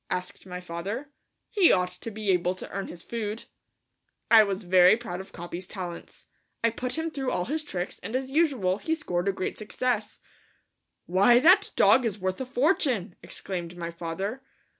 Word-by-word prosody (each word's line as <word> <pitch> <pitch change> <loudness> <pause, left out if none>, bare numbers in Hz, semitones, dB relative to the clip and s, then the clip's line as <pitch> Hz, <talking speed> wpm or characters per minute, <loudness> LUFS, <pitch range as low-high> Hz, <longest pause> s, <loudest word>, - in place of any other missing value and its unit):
asked 180 +1 -4
my 180 0 -5
father. 195 +11 -5 0.4
"He 390 -5 +5
ought 180 -1 +2
to 180 +5 -8
be 215 -2 -1
able 180 0 +1
to - - -8
earn 195 +1 -4
his 170 - -10
food." 220 -1 -4 0.9
I 225 -1 +10
was 200 0 -3
very 180 +3 +6
proud 225 -7 -6
of 190 - -13
Capi's 175 +1 -7
talents. 180 -4 -8 0.4
I 230 - +4
put 250 +5 -3
him 325 0 -2
through 270 -3 -2
all 180 - -1
his 310 +4 -1
tricks 180 -11 -5
and 235 - -5
as 260 0 -2
usual 265 - +2
he 320 +6 0
scored 180 - -2
a - - +4
great 190 -1 -4
success. 220 +1 -2 0.9
"Why, 195 +7 +5
that 370 +7 +6
dog 260 - +5
is 220 -4 -1
worth 185 +3 -2
a 260 - -4
fortune," 255 - +1
exclaimed 175 -2 -6
my 170 -1 -4
father. 175 +9 -4
200 Hz, 180 wpm, -27 LUFS, 180-255 Hz, 0.9 s, I